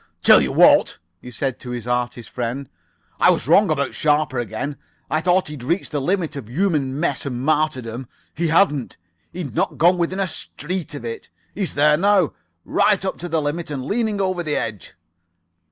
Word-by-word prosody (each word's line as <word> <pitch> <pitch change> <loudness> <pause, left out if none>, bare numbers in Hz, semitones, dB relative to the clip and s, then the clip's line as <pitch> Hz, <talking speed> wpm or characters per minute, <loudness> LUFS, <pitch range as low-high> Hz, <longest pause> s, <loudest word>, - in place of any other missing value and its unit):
"Tell - - +8
you - - -1
what," - - +5 0.2
he 125 - -10
said 125 +2 -3
to 125 - -9
his 120 -2 -5
artist 125 -1 -2
friend. 125 +3 -4 0.5
"I - - +6
was - - +1
wrong 195 +5 +5
about 140 -3 0
Sharper 150 -4 +1
again. 120 +5 -4 0.3
I 155 - +1
thought 180 +2 +2
he'd 150 -3 -7
reached 170 +10 -2
the 145 -2 -1
limit 175 +1 -1
of 130 -6 -7
human 145 -3 0
mess 155 -5 -1
and 125 -3 -4
martyrdom. 130 -5 -1 0.3
He 170 +2 -1
hadn't. 155 -5 +2 0.3
He'd 170 -9 -6
not - - -1
got 175 +2 +4
within 180 +3 -1
a 195 - +2
street 170 -1 -5
of 120 - -7
it. 115 0 -6 0.2
He's 195 -3 -3
there 150 +1 +4
now. 195 -2 +3 0.3
Right 200 -2 +2
up 190 - -3
to 175 - -6
the 160 -2 0
limit 150 +3 -3
and 135 -3 -4
leaning 215 - -1
over 185 -2 0
the 155 -3 -2
edge. 105 -4 -4
150 Hz, 185 wpm, -21 LUFS, 130-175 Hz, 0.5 s, Tell